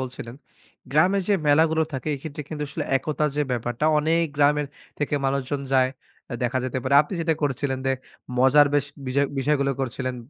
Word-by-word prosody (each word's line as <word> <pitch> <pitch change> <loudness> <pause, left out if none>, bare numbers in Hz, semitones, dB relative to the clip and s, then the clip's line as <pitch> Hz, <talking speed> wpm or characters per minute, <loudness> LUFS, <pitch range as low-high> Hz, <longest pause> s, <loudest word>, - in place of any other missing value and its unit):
বলছিলেন 125 -2 -6 0.6
গ্রামের 185 +7 +3
যে 205 - +4
মেলাগুলো 160 +2 +4
থাকে, 135 +3 -4
এক্ষেত্রে 150 +2 -7
কিন্তু 150 -2 -5
আসলে 140 - -4
একতা 150 +2 -1
যে 150 - +2
ব্যাপারটা, 120 +2 -2
অনেক 165 +2 +2
গ্রামের 145 0 +3 0.3
থেকে 145 0 -1
মানুষজন 140 +1 -1
যায়। 130 -1 +4 0.4
আ - - -2
দেখা 125 +1 0
যেতে 130 0 -2
পারে, 130 +2 +1
আপনি 155 - -7
যেটা 165 -1 +1
করছিলেন 135 -1 -1
যে, 135 - +3 0.5
মজার 140 +3 +6
বেশ 145 -1 +2 0.2
বিজয়, 140 +2 +1
বিষয়গুলো 140 0 +1
করছিলেন, 130 0 -3
140 Hz, 170 wpm, -24 LUFS, 130-150 Hz, 0.6 s, মজার